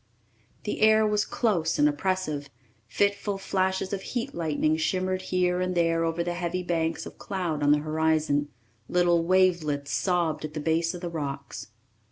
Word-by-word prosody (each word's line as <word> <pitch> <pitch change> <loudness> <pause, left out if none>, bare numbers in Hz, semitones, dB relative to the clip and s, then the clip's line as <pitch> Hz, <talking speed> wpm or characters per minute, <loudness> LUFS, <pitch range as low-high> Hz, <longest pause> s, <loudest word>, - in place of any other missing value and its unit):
The 210 - -3
air 220 0 +6
was 210 0 +1
close 175 -9 0
and 295 - +5
oppressive; 185 - -1 0.4
fitful 200 - 0
flashes 190 0 -1
of 195 - -2
heat 240 +3 -4
lightning 155 -2 0
shimmered 185 +3 -1
here 180 -1 0
and 185 0 -1
there 165 -1 +2
over 165 +1 -1
the 175 0 -2
heavy 175 +1 -2
banks 165 -2 -1
of - - -11
cloud 175 -6 -3
on 145 0 +4
the 150 - +6
horizon; 155 -2 +1 0.4
little 175 -1 +3
wavelets 170 -6 +2
sobbed 170 -5 0
at 155 0 -6
the - - -2
base 165 +3 0
of 175 - -8
the 175 - -3
rocks. 140 -4 -5
175 Hz, 165 wpm, -27 LUFS, 155-185 Hz, 0.4 s, air